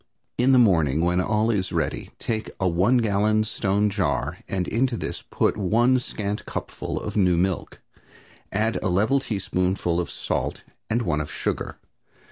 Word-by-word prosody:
"In 125 +2 +3
the 130 - +6
morning, 80 - +4
when 90 +1 +2
all 110 +3 +1
is 95 -4 -1
ready, - - -2
take 110 -1 -3
a 95 - +2
one 90 +9 +3
gallon 110 -1 +2
stone 100 -1 0
jar 80 -10 -1
and 95 -2 -2
into 120 +1 0
this - - -4
put - - 0
one 120 +6 +3
scant 105 -4 -4
cupful - - -4
of - - -5
new 90 -4 +3
milk. 95 +1 -1 0.7
Add 110 +3 0
a - - 0
level 110 +10 +3
teaspoonful 90 -6 -1
of 85 -4 -2
salt - - -3 0.3
and 120 +2 +1
one 75 -6 0
of 75 - -6
sugar. - - -3
100 Hz, 160 wpm, -24 LUFS, 90-110 Hz, 0.7 s, the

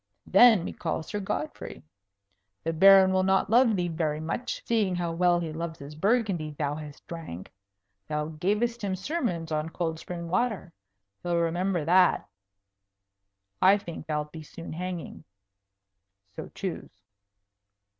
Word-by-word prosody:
"Then 210 -2 +6
we - - -5
call 160 -1 -3
Sir 205 +6 -4
Godfrey. 155 -6 -5 0.8
The 165 - -1
Baron 190 +2 +7
will 190 - +3
not 190 +2 +2
love 235 -1 +5
thee 180 -2 0
very 160 -2 -1
much, 165 +10 -4
seeing 210 -6 +1
how 175 -1 -2
well 175 +1 +3
he 165 -2 -4
loves 165 0 -5
his 140 +2 -10
Burgundy 190 -4 0
thou 145 -1 -1
hast 150 -1 -9
drank. 160 - -8 0.5
Thou 150 0 -2
gavest 210 +9 -1
him 195 -2 -1
sermons 185 - -3
on 155 +1 -1
cold 165 -1 -3
spring 170 -1 -6
water. 190 -2 -1 0.5
He'll 175 -1 0
remember 175 0 0
that. 180 +2 +4 1.3
I 195 +2 +6
think 170 -6 -8
thou'lt 150 -1 -2
be 160 - -8
soon 165 +2 -9
hanging. 180 -1 -6 1.1
So - - -7
choose." 165 - -6
175 Hz, 140 wpm, -27 LUFS, 160-195 Hz, 1.3 s, Baron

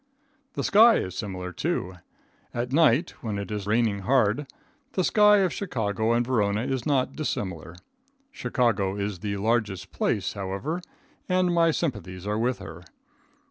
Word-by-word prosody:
The - - -3
sky 225 +3 +6
is 95 0 -2
similar, 90 -4 -5
too. 95 - -2 0.6
At 120 +2 -2
night, 160 +1 +4
when 110 -3 -3
it 100 +1 -5
is 105 -2 -4
raining 110 -2 +1
hard, 125 +4 +2 0.5
the 185 - +1
sky 210 +2 +5
of 185 -4 +1
Chicago 110 - -1
and 120 +1 +2
Verona 105 -4 +1
is 130 -2 -2
not 135 -2 +1
dissimilar. 90 - -4 0.6
Chicago 110 - 0
is 100 -2 -3
the 100 +1 -3
largest 105 -3 -1
place, - - -1
however, 100 - -3 0.5
and 180 -1 +2
my 165 -1 +4
sympathies 105 - -3
are 105 +1 -1
with 125 +2 0
her. 80 +2 -9
115 Hz, 145 wpm, -26 LUFS, 100-145 Hz, 0.6 s, sky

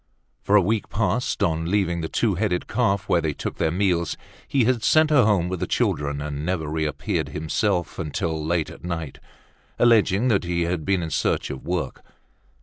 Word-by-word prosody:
For 100 - +2
a 100 - +6
week 110 +3 -1
past, 110 +3 0
on 80 0 0
leaving 90 -4 +1
the 80 - -2
"Two 110 +5 +1
Headed 90 -1 -1
Calf," 105 -4 0
where 85 - +3
they 80 -2 -1
took - - -5
their - - +1
meals, 90 -1 0 0.3
he 135 -3 +2
had 120 0 +2
sent 155 0 +4
her 135 -6 +5
home 100 -5 +2
with 90 -1 -3
the - - -2
children 70 0 0
and 75 -1 -4
never 85 -2 -2
reappeared 80 0 -2
himself 85 +5 -1
till 80 -3 -2
late 80 0 -1
at - - -13
night, 80 -5 -5 0.6
alleging 115 -1 +4
that 100 -4 +2
he 85 -1 -1
had 85 -2 -2
been 95 -3 +1
in 80 - -4
search - - 0
of 65 - -7
work. 85 -7 -2
90 Hz, 190 wpm, -24 LUFS, 80-105 Hz, 0.6 s, a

